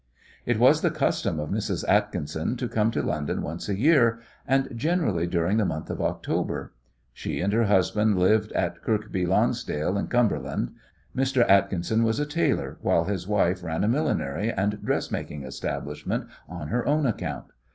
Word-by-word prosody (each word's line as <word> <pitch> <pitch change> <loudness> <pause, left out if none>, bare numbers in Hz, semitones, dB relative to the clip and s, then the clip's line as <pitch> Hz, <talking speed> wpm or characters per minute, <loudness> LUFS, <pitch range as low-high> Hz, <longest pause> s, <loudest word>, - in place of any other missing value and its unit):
It - - +2
was - - +5
the - - +3
custom 80 - 0
of 75 - -4
Mrs. - - -2
Atkinson 80 - 0
to 125 - -2
come 110 -1 +1
to - - -1
London 75 -2 -2
once 85 +6 -5
a 100 - 0
year, 120 -3 +4 0.3
and 135 0 +2
generally 115 - 0
during 85 +4 +1
the 110 - +3
month 80 -2 -3
of - - -4
October. - - -2 0.4
She - - -4
and 100 +3 0
her 115 +1 +3
husband 105 +1 +2
lived 105 +4 +3
in 85 - +1
Kirkby 105 -5 -1
Lonsdale, 100 -4 +1
in - - -2
Cumberland. 120 - 0 0.4
Mr. 130 -2 +2
Atkinson 100 +2 +3
was 115 +3 +1
a 150 - +1
tailor, 155 +3 -1
while - - +2
his 95 -2 -3
wife 95 -3 +1
ran 80 +1 -2
a - - +2
millinery 115 - 0
and 105 +1 -1
dressmaking 75 -2 -2
establishment 65 +1 -4 0.2
on 85 -4 -6
her 120 +2 0
own 150 +1 +2
account. 115 - -3
105 Hz, 165 wpm, -26 LUFS, 90-115 Hz, 0.4 s, was